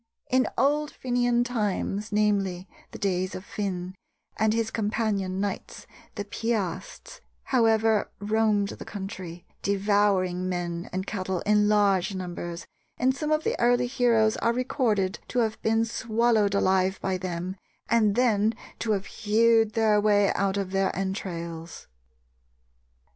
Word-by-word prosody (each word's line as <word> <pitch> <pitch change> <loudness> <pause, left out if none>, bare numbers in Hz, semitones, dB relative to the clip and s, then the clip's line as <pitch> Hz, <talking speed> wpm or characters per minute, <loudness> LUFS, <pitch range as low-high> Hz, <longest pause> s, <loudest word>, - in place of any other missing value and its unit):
In 255 0 +3
old 295 +2 +2
Fenian 245 -2 +1
times, 215 -3 -2
namely, 200 -3 +1 0.2
the - - -9
days 185 -1 -1
of 185 - -7
Finn 185 -3 -4 0.4
and 220 0 +2
his 225 0 0
companion 205 -3 -1
knights, 200 -1 -4 0.3
the 205 - -4
Piasts, 205 - -4 0.2
however, 225 -3 +2
roamed 210 -1 +1
the - - -8
country, 190 -4 -7 0.2
devouring 195 -2 +1
men 180 -1 -1
and 170 -1 -4
women 170 - -9
and 185 +1 -3
cattle 190 -3 -3
in 210 0 +3
large 200 -2 +2
numbers, 175 -2 -5 0.3
and 260 +1 +2
some 300 +2 -3
of 310 0 +2
the - - 0
early 245 +1 +3
heroes 235 -4 +2
are 235 - +1
recorded 230 -6 0
to - - -5
have 220 -2 0
been 225 +1 +2
swallowed 225 -2 +1
alive 190 0 +2
by 190 -1 -2
them 180 0 -4 0.3
and 215 -3 +3
then 225 -3 +2 0.2
to 220 -2 0
have 195 -1 -2
hewed 225 0 +2
their 215 -2 +3
way 205 -1 +3
out 200 0 0
of 195 -2 -2
their 195 0 +1
entrails. 170 -4 -5
205 Hz, 140 wpm, -26 LUFS, 190-225 Hz, 0.4 s, In